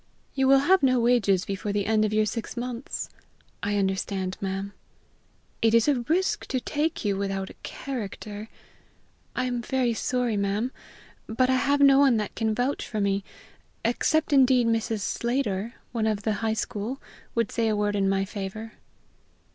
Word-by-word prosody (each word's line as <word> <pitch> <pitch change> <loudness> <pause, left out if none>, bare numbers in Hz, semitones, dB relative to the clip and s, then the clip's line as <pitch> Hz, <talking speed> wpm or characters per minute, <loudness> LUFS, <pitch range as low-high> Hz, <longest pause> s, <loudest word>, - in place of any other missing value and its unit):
"You 270 -1 +2
will 270 0 +6
have 375 +6 +4
no 255 -2 +4
wages 230 -6 +3
before 200 +1 -3
the 205 -1 0
end 215 0 +3
of 210 - -1
your 215 0 +3
six 230 +2 -4
months." 245 +1 -4 0.5
"I 205 0 0
understand, 190 -1 -1
ma'am." 195 +1 -3 0.9
"It 225 0 +4
is 230 +2 +4
a 285 -4 +3
risk 370 +4 +1
to 260 - -1
take 300 +2 -2
you 200 -1 +2
without 195 -1 -2
a - - -19
character." 215 -4 -6 0.9
"I - - 0
am 245 -1 -1
very 250 -1 0
sorry, 245 -1 0
ma'am; 200 +5 0 0.6
but 255 +4 +2
I - - +4
have 280 +2 +2
no 275 -1 +7
one 270 -5 +5
that 210 -2 -3
can 220 -1 0
vouch 250 +5 -1
for 215 - -3
me 200 -1 +1 0.6
except, 305 +6 +1
indeed, 260 -3 +5
Mrs. 225 -1 0
Slater, 235 -1 -1 0.2
of 220 -3 0
the 220 - +1
High 220 -1 +1
School, 220 +5 -3 0.4
would 230 -3 +1
say 230 -1 0
a 215 - +2
word 205 0 0
in 195 -1 +2
my 195 0 +1
favor." 205 +3 -6
225 Hz, 170 wpm, -26 LUFS, 205-255 Hz, 0.9 s, no